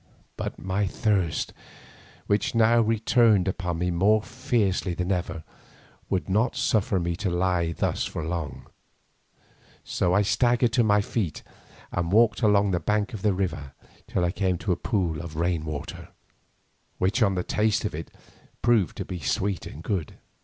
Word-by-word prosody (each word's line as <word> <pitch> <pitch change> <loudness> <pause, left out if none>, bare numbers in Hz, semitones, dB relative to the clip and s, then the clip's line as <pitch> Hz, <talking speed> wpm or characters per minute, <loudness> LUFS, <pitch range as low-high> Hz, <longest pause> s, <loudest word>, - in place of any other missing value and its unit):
But - - -5
my 95 +2 -1
thirst, 95 -4 0 0.7
which 100 +3 0
now 115 +1 +5
returned 110 -2 +3
upon 90 -2 -2
me 90 +1 0
more 105 +5 +3
fiercely 105 -8 -1
than 90 +2 -2
ever, 90 -3 -2 0.7
would 90 -6 -1
not 110 +6 +1
suffer 100 -3 +1
me 85 0 -1
to 100 -1 -1
lie 90 -1 0
thus - - -1
for 80 - -4
long, 80 -5 -4 1.2
so 90 - 0
I 105 - +4
staggered 120 +2 +2
to 120 - +4
my 105 -1 +4
feet 100 -6 -3 0.5
and 85 -1 -1
walked 105 -3 +4
along 100 -2 +4
the 90 - +1
bank 105 +7 0
of 105 - -6
the 105 -1 +2
river 85 -8 -3 0.3
till 90 - 0
I 85 - +1
came 95 -2 0
to 100 +2 -2
a - - +3
pool 85 -9 -1
of 85 -2 -8
rain 85 -1 0
water, 75 -2 -6 0.9
which 100 +7 +1
on 100 -3 +3
the 90 - -1
tasting, 105 +2 0 0.6
proved 115 -8 +2
to - - -4
be 90 - -5
sweet 95 +5 -1
and 80 - -10
good. 90 -8 -2
95 Hz, 160 wpm, -26 LUFS, 85-105 Hz, 1.2 s, now